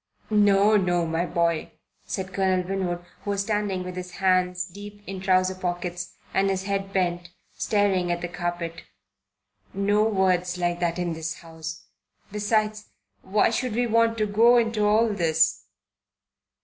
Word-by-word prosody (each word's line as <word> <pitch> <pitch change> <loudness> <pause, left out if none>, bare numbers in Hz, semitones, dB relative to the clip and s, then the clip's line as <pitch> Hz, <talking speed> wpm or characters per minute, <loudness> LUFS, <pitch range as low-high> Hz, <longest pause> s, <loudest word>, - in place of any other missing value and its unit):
"No, 205 0 +5
no, 175 -3 +1
my 165 +2 -1
boy," 170 -2 0 0.3
said 190 0 -4
Colonel 185 -2 +1
Winwood, 180 -2 -2 0.2
who - - -6
was 200 -1 0
standing 205 -3 -1
with 180 0 -7
hands 180 -1 +1
deep 205 +2 -11
in 190 -1 -6
trouser 185 -1 +3
pockets 175 -1 -4 0.2
and 195 0 +2
his 190 -1 -1
head 195 0 -2
bent, 175 -2 -1 0.3
staring 195 -4 +1
at 175 0 -2
the 175 - -2
carpet. 175 -1 -4 0.9
"No 205 +2 +2
words 185 -4 +1
like 175 -1 -1
that 170 -1 0
in 175 -1 -1
this 160 0 -4
house. 160 -1 -8 0.5
Besides, 215 0 0 0.3
why 210 +3 +2
should 245 -1 -2
we 245 +1 +2
want 230 0 +2
to 215 - +1
go 230 +4 +5
into 225 -2 +1
all 220 +2 +4
this?" 165 -5 +1
185 Hz, 150 wpm, -25 LUFS, 175-205 Hz, 0.9 s, No